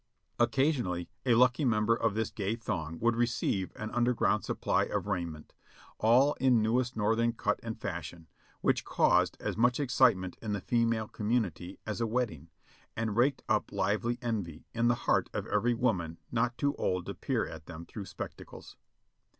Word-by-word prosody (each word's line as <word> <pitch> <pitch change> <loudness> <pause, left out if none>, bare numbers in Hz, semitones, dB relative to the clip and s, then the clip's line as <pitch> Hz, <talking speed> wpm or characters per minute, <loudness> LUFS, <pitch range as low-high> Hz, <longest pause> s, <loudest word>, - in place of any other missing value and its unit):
Occasion 135 -5 +2
ally 90 -1 -2 0.2
a 120 - +5
lucky 125 +4 +4
member 115 -2 +3
of 115 -3 0
this 110 -1 -1
gay 105 +1 -2
throng 85 -9 -4
would 120 0 +3
receive 115 -5 0
an 110 0 -5
under 120 0 +2
ground - - +2
supply - - 0
of - - -2
raiment, 85 -6 -4 0.5
all 125 +6 +5
in 130 -3 +4
newest 120 +2 +1
Northern 115 +2 +2
cut 105 -2 -1
and 110 -1 -6
fashion, 85 -4 -6 0.3
which - - +2
caused - - +2
as - - -3
much 125 +3 +3
excitement 120 -9 +2
in 110 -2 -3
the 100 - -1
female 115 0 +1
community 105 -6 -2
as 110 +1 -3
a 115 - +1
wedding, 110 - -2 0.5
and 110 -2 -1
raked 130 +4 +2
up 110 -2 +1
lively 105 +4 0
envy 100 -10 -3
in 120 0 +1
the 120 - +4
heart - - +2
of - - -2
every 120 +4 +1
woman 90 -9 0
not 120 +1 0
too 145 -1 +1
old 90 -1 -1
to - - -4
peer - - -1
at 80 -1 -10
them 85 0 -8
through 100 +2 -7
spectacles. - - -9
110 Hz, 175 wpm, -31 LUFS, 95-120 Hz, 0.5 s, a